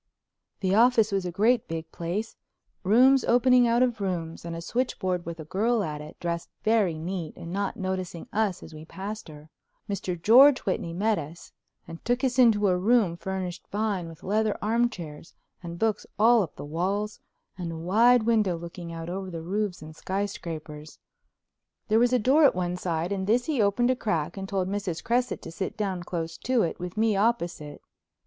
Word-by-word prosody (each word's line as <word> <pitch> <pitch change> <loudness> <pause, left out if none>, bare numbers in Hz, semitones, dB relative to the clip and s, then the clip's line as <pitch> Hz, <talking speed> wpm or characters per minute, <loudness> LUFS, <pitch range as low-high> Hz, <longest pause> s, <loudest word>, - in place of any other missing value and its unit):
The 190 -1 +1
office 225 0 +4
was 195 -2 -1
a - - -4
great 220 +6 +2
big 165 -1 -5
place, 180 +7 -4 0.5
rooms 255 +7 +5
opening 250 0 +4
out 235 +2 +3
of 240 -4 -1
rooms, 170 -4 -3
and 170 0 -5
a - - -5
switchboard 185 -5 -2
with 170 0 -6
a 155 - -7
girl 215 +6 +1
at 150 -4 -4
it, 150 - -11
dressed 170 -1 -3
very 215 -7 +2
neat 170 0 -5
and 170 +1 -7
not 200 0 -2
noticing 185 -3 -4
us 210 -4 0
as 160 - -11
we 155 0 -9
passed 200 +5 -7
her. 155 0 -13 0.4
Mr. 190 -4 -3
George 255 - +7
Whitney 180 -3 -2
met 210 +5 +1
us 160 +3 -9 0.4
and 165 -1 -10
took 245 +3 0
us 260 -1 +1
into 215 -4 +5
a 185 - +3
room 210 -3 +3
furnished 185 0 -5
fine 205 -5 -2
with 165 - -13
leather 215 +1 0
armchairs 205 -9 -2 0.3
and 170 -1 -7
books 220 +2 -1
all 230 +2 +5
up 175 - -4
the - - -8
walls 195 +7 -2 0.4
and 175 -3 -5
a 165 - -6
wide 220 +8 +4
window 215 -6 +2
looking 170 0 -8
out 165 0 -6
over 190 +2 -4
the 165 -2 -6
roofs 195 -1 -2
and 155 0 -11
skyscrapers. 160 -6 -5 0.9
There 220 +1 +4
was 240 +1 +3
a 250 - +4
door 265 +7 +4
at 280 - +5
one 180 -1 -1
side, 175 0 -2
and 190 -1 -2
this 240 +3 +2
he 290 -7 0
opened 225 +5 +2
a - - +1
crack 170 -11 -2
and 195 -1 -6
told 190 -2 -1
Mrs. 195 -4 -3
Cresset 245 +1 0
to - - -7
sit 190 +5 -4
down 195 -4 -2
close 165 -2 -4
to 250 -2 +1
it 170 - -3
with 180 +2 -6
me 220 -1 +2
opposite. 175 -9 -1
190 Hz, 190 wpm, -27 LUFS, 170-225 Hz, 0.9 s, George